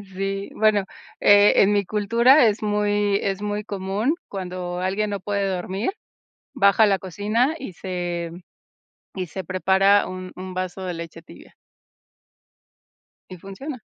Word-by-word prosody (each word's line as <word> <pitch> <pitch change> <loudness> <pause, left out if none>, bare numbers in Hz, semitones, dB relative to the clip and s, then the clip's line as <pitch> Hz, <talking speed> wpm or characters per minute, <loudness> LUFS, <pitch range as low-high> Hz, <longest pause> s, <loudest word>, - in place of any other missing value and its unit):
Sí, 195 +1 -3
bueno, 215 -2 +3 0.4
eh, 205 0 +6
en 205 +1 +5
mi 200 -1 +1
cultura 235 +8 +4
es 210 0 0
muy 205 -1 +1
es 195 0 -2
muy 210 0 -3
común, 200 - -2
cuando 180 -2 -5
alguien 195 +3 -1
no 200 -1 -3
puede 200 +1 -2
dormir, 190 - -2 0.6
baja 200 +2 +4
a - - +7
la 195 -2 +2
cocina 215 - 0
y 265 - -8
se 175 -2 -4 0.8
y 185 -2 -3
se 190 +2 -7
prepara 190 +3 +3
un 185 0 -7
un 185 0 -7
vaso 185 +1 -4
de 180 -1 -3
leche 165 0 -8
tibia. - - -16 1.8
Y 185 - -9
funciona. 240 - -8
195 Hz, 140 wpm, -23 LUFS, 185-210 Hz, 1.8 s, a